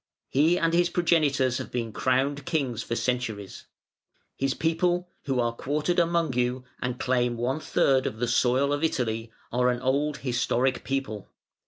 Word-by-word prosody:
He 155 +6 +3
and 165 -1 +1
his 175 0 +3
progenitors 145 -7 +2
have - - -6
been 115 -2 -2
crowned 135 +4 +1
Kings 135 -9 -1
for 115 - -3
centuries. 115 -6 -3 0.7
His 135 0 -1
people, 175 +2 +1 0.2
who 135 -2 0
are 120 -1 +1
quartered 150 +8 -1
among 170 -4 +1
you 125 +1 0 0.2
and 125 -1 -3
claim 125 -2 +1
one 125 +5 -1
third 135 -3 +2
of 110 - -5
the 120 +1 -1
soil 130 +4 +2
of 145 +2 -2
Italy, 115 -7 -1 0.2
are 125 +1 +2
an 125 -1 0
old, 140 +3 0
historic 125 0 0
people. 135 -7 -3
130 Hz, 160 wpm, -27 LUFS, 120-150 Hz, 0.7 s, He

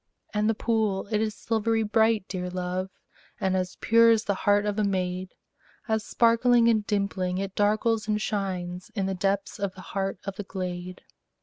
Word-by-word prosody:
And 210 +1 +1
the 225 - +1
pool, 215 -4 0
it 215 -1 +2
is 215 -1 -1
silvery 225 +1 0
bright, 220 -1 +2
dear 180 -2 -4
love, 180 +1 -3 0.5
And 190 -2 +1
as 185 -1 -2
pure 230 0 +5
as 225 -1 +4
the 205 - 0
heart 205 +1 +2
of 210 0 -1
a - - +2
maid, 185 -1 -2 0.5
As 220 -1 0
sparkling 235 +1 +4
and 220 -2 +3
dimpling, 195 -3 -1
it 195 0 -3
darkles 215 +2 +1
and 210 -1 +1
shines 185 -4 -3
In 195 -3 0
the 195 - -1
depths 195 +3 -1
of 200 -2 -2
the 190 - -10
heart 195 -1 -1
of 195 -1 -5
the 205 - -4
glade. 185 -1 -5
200 Hz, 185 wpm, -27 LUFS, 185-220 Hz, 0.5 s, pure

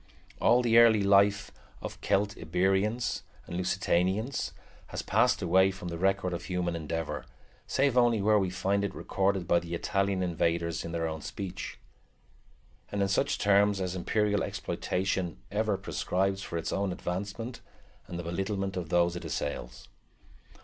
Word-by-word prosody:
All 120 +2 +5
the 115 -1 +6
early 110 -3 +6
life 100 0 +4 0.3
of - - -7
Celtiberians 95 +4 +1 0.2
and 85 - -7
Lusitanians 95 +6 0 0.4
has - - -5
passed - - +2
away 95 +2 +5
from 95 -2 -6
the 85 - -4
record 95 -1 +1
of 85 - -5
human 90 -2 -1
endeavor, 80 0 -4 0.4
save 135 -2 +2
only 120 -3 +4
where 105 +1 +4
we 95 -2 0
find 100 +2 0
it 100 -1 -3
recorded 95 -2 0
by 85 - +4
the 85 0 -5
Italian 95 +1 0
invaders 85 -1 0
in 85 - -5
their 85 -1 -1
own 80 -1 -5
speech, 95 +1 -6 1.1
and 100 -1 0
in - - +2
such 100 - +1
terms 100 0 +3
as 90 -1 -2
imperial 105 +3 +1
exploitation 95 -2 -2
ever 105 -1 +1
prescribes 95 0 -1
for 85 - -4
its 80 - -3
own 100 -1 0
advancement 100 +7 -4 0.5
and 85 - -6
the 85 - -4
belittlement 95 +3 -2
of 90 -4 -4
those 85 0 +2
it 90 - -6
assails. 65 -3 -4
95 Hz, 150 wpm, -29 LUFS, 85-100 Hz, 1.1 s, the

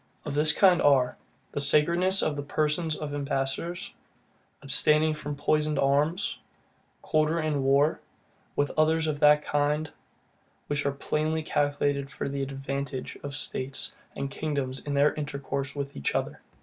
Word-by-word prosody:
Of - - -3
this 150 +1 +5
kind 180 +2 +5
are, 135 -3 +4 0.4
the 145 - -2
sacredness 170 +7 +3
of 150 - 0
the 145 - -3
person 150 +3 0
of 150 -2 -5
ambassadors, 145 +4 -2 0.7
abstaining 150 +3 +3
from 150 -1 -5
poisoned 150 +1 +1
arms, 150 +8 +1 0.6
quarter 155 +1 +1
in 155 -3 0
war, 140 +3 +3 0.6
with 145 - +1
others 160 +1 +3
of 150 -2 -2
that 150 0 +5
kind, 150 +1 0 0.7
which 145 -1 -1
are - - +2
plainly 155 +3 -1
calculated 145 -2 0
for - - -4
the 140 0 -3
ADVANTAGE 135 -1 -4
of 140 -1 -6
states 135 -2 -2 0.2
and 140 - -4
kingdoms 140 -4 -2
in 145 - -1
their 145 +1 +4
intercourse 140 -2 -4
with 140 -1 -5
each 70 - -2
other. - - -2
145 Hz, 145 wpm, -27 LUFS, 140-155 Hz, 0.7 s, this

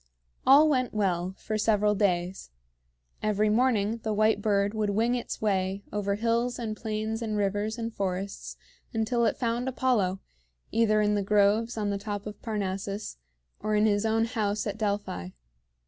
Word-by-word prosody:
All 285 +4 +8
went 255 -6 +1
well 185 -3 0
for 215 -1 -3
several 210 -1 +3
days. 185 - 0 0.7
Every 215 0 +1
morning 225 -2 +2
the 215 -1 -2
white 215 0 +3
bird 205 -1 +1
would 215 -2 0
wing 225 +4 +1
its 240 -2 -4
way 195 -1 0
over 200 -1 0
hills 235 +3 0
and 225 -3 -3
plains 220 +1 -3
and 215 -2 -2
rivers 205 +2 -1
and 230 -1 -4
forests 195 0 -4 0.4
until 235 +2 +1
it - - +1
found 240 +1 -1
Apollo, 225 -8 +1 0.5
either 215 -2 +3
in 210 0 +2
the 205 - +1
groves 210 +3 +2
on 205 -2 0
the 200 - -2
top 205 0 -5
of 210 0 -8
Parnassus 200 - -3 0.4
or 215 0 -1
in 210 +1 +4
his 205 -1 +2
own 225 0 +2
house 210 -3 -1
at 205 0 -4
Delphi. 200 - -2
210 Hz, 165 wpm, -28 LUFS, 200-225 Hz, 0.7 s, All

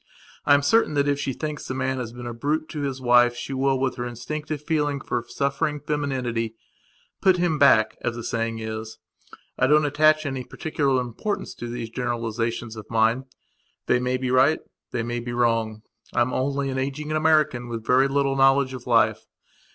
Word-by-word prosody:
I 145 - +7
am 140 - +1
certain 155 0 +3
that 140 0 +2
if 145 0 +1
she 140 -2 -1
thinks 150 +2 -5
the 130 - -3
man 130 0 -1
has 120 -2 -4
been 120 0 -9
a 120 - -4
brute 150 +6 -1
to 150 - -5
his 135 -2 -3
wife 120 -1 +4
she 135 - -5
will, 135 0 +1
with 130 -1 -1
her 120 - -3
instinctive 150 +6 -5
feeling 150 -3 0
for 120 -3 -3
suffering 140 +3 -1
femininity, 130 -7 -2 0.7
"put 190 -2 +4
him 170 -4 +1
back", 115 -6 +5
as 120 -1 -2
the 120 - -6
saying 115 0 -2
is. 110 0 -6 0.6
I 130 - +4
don't 150 +2 +4
attach 155 +2 +3
any 135 -2 -3
particular 140 -3 -1
importance 125 - -3
to 120 - -7
these 120 -1 -5
generalizations 115 -1 -3
of 110 -2 -10
mine. 115 +3 +2 0.6
They - - +3
may 125 +1 0
be 130 -1 -2
right, 130 +5 +4 0.3
they 120 -2 -2
may 120 +1 -3
be 120 0 -5
wrong; 115 -2 0 0.3
I 120 - +3
am 120 +2 +1
only 140 +1 -1
an 130 - -2
ageing 140 +3 -3
American 155 -5 +2
with 115 -2 -5
very 130 +2 +4
little 140 0 +1
knowledge 135 0 +4
of 125 -1 -8
life. 120 -2 +2
130 Hz, 190 wpm, -24 LUFS, 120-145 Hz, 0.7 s, I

